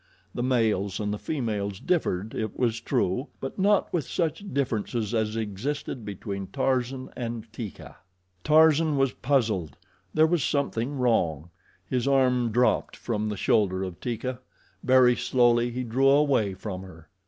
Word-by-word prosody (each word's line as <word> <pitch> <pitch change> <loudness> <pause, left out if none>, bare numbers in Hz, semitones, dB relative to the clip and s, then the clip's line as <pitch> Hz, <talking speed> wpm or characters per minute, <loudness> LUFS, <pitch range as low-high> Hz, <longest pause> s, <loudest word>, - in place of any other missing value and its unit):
The - - -3
males 110 -6 +1
and 105 -1 -1
the 105 - -4
females 105 -9 -3
differed, 110 - -1
it 110 -2 -4
was 115 -2 0
true; 120 +4 0
but 135 +8 -6
not 205 +1 +2
with 165 -6 0
such 165 +1 -1
differences 120 -4 -1
as 110 -1 0
existed 115 +4 -4
between 100 -1 -5
Tarzan 130 0 -1
and 115 -2 -4
Teeka. 115 -4 -8 0.5
Tarzan 155 -1 +4
was 135 -1 +2
puzzled. 110 - 0 0.3
There 155 0 +4
was 160 -3 +1
something 140 0 -1
wrong. 85 - 0 0.4
His 125 0 -1
arm 125 -3 +3
dropped 125 +3 +2
from 110 -2 -2
the 105 - -4
shoulder 95 -2 +2
of 90 -2 -6
Teeka. 125 +1 -3 0.4
Very 130 -1 +5
slowly 120 -1 +3
he 125 +2 -3
drew 130 +3 +2
away 135 -9 +3
from 95 -1 -6
her. 85 -4 -13
120 Hz, 145 wpm, -26 LUFS, 105-135 Hz, 0.5 s, Very